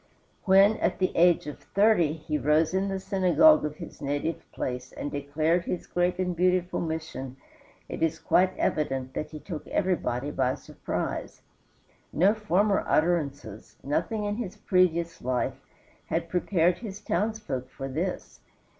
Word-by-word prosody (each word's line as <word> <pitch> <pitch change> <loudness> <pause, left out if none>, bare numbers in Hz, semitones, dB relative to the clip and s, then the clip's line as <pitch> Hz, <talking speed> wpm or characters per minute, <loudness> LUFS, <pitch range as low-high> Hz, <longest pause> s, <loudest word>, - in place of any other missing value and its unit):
When, 195 +2 +6
at - - 0
the 185 - 0
age 175 0 +4
of 150 - -7
thirty, 200 -7 +3
he 155 -1 -4
rose 150 +5 +2
in 190 +1 +1
the 195 -1 -2
synagogue 195 - +4
of 150 -1 -3
his 165 0 -10
native 145 +3 -3
place 125 0 -4
and 145 - -5
declared 155 +5 0
his 180 - -3
great 175 0 0
and 180 -1 -1
beautiful 180 +1 +1
mission 160 -5 -5 0.5
it - - -6
is 165 0 +1
quite 185 +2 +2
evident 135 -4 -1
that 150 - -4
he 155 - -8
took 160 -1 -7
everybody 145 -8 -1
by 130 -2 0
surprise. - - -5 0.7
No 190 +7 +4
former 205 -1 +1
utterances, 145 - -1
nothing 210 - -1
in 205 0 -2
his 220 -7 -5
previous 170 -3 +1
life, 130 +1 -2 0.5
had 165 0 -2
prepared 175 -1 +1
his 210 -4 -7
townsfolk 210 - -2
for 135 0 -6
this. 165 +8 -4
170 Hz, 145 wpm, -27 LUFS, 145-190 Hz, 0.7 s, When